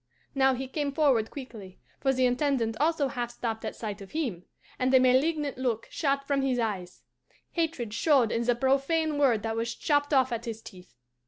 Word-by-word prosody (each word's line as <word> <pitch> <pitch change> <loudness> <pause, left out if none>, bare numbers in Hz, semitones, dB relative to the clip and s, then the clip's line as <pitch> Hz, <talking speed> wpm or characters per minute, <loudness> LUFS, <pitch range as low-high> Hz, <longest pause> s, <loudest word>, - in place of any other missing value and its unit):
"Now 265 -1 +3
he 265 +1 -5
came 285 +1 -2
forward 275 -7 +2
quickly, 220 -9 -9 0.2
for 270 - +2
the 260 -1 +2
Intendant 250 -3 +1
also 305 -1 +2
half 245 -3 -3
stopped 230 -2 -4
at - - -4
sight 210 -2 -6
of 195 - -11
him, 240 - -3 0.3
and 255 0 +2
a - - +8
malignant 275 +2 +2
look 240 -4 -1
shot 275 -2 0
from 275 -1 +1
his 265 -2 0
eyes; 200 -6 -3 0.5
hatred 315 -10 -2
showed 255 -2 +3
in 230 - 0
the 240 +1 +2
profane 285 +4 +1
word 245 -7 +3
that 225 0 -2
was 230 +1 -2
chopped 290 -1 +1
off 260 -3 +3
at 235 0 -3
his 225 -2 -5
teeth. 180 - -14
255 Hz, 190 wpm, -28 LUFS, 230-280 Hz, 0.5 s, a